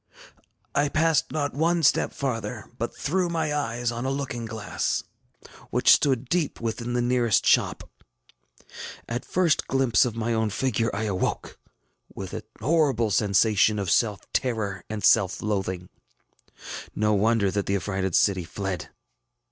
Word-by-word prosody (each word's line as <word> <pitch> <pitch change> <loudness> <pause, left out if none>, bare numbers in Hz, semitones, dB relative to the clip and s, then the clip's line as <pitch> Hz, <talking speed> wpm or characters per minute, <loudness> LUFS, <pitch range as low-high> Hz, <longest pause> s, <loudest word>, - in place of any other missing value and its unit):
ŌĆ£I 145 -1 +1
passed 160 -2 +2
not 145 -2 -2
one 165 +3 +1
step - - +3
farther, 115 -5 -4
but 120 - -3
threw 180 +3 0
my 160 -3 -1
eyes 120 -4 -1
on 120 +1 -4
a 130 - -1
looking 135 -4 -3
glass 110 -1 -2 0.7
which - - +4
stood 130 -3 +3
deep 165 +2 -1
within 115 +1 -3
the 120 0 +1
nearest 120 -4 +2
shop. - - +2 1.2
At 120 +2 -3
first 180 -4 +1
glimpse 130 -5 +3
of 120 -3 -2
my 115 +1 -1
own 110 -1 +1
figure 115 +1 0
I 105 - -3
awoke, 100 -4 -2 0.6
with - - -7
a - - -4 0.2
horrible 130 -5 +2
sensation 105 +2 +3
of 100 -4 -1
self 105 -2 +2
terror 105 -7 -1
and 105 -2 -5
self 95 -1 +4
loathing. 95 -4 -2 1.1
No 105 0 +2
wonder 105 -1 +2
that 100 0 -2
the 100 - +1
affrighted 95 -2 -2
city 95 -3 +3
fled! 95 +2 -5
115 Hz, 145 wpm, -25 LUFS, 105-135 Hz, 1.2 s, which